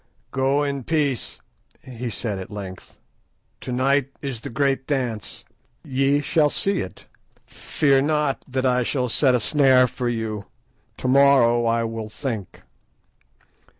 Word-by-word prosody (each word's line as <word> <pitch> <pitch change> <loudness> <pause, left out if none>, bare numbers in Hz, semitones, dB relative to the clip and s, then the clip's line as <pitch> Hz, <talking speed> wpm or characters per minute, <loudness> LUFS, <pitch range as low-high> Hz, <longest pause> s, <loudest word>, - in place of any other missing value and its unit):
"Go 135 +2 +1
in 140 -2 -2
peace," 145 -4 -1 0.4
he 125 -1 -6
said 105 -2 -4
at 95 - -8
length. 100 -3 -9 0.6
"To - - -6
night 135 +2 +1
is 135 -5 -5
the - - -6
great 135 +2 0
dance. 125 -7 -3 0.4
Ye 135 0 +1
shall 150 +1 +2
see 195 +5 0
it. 90 - -7 0.4
Fear 140 -3 +1
not 150 -1 0
that 130 0 -2
I 125 -1 +3
shall 125 0 -1
set 130 +2 +3
a - - +2
snare 130 0 +4
for 125 0 -3
you. 110 -3 -4 0.5
To - - -3
morrow 130 -3 +5
I 115 0 +1
will 115 -1 -4
think." 110 - -6
130 Hz, 140 wpm, -23 LUFS, 115-140 Hz, 0.6 s, morrow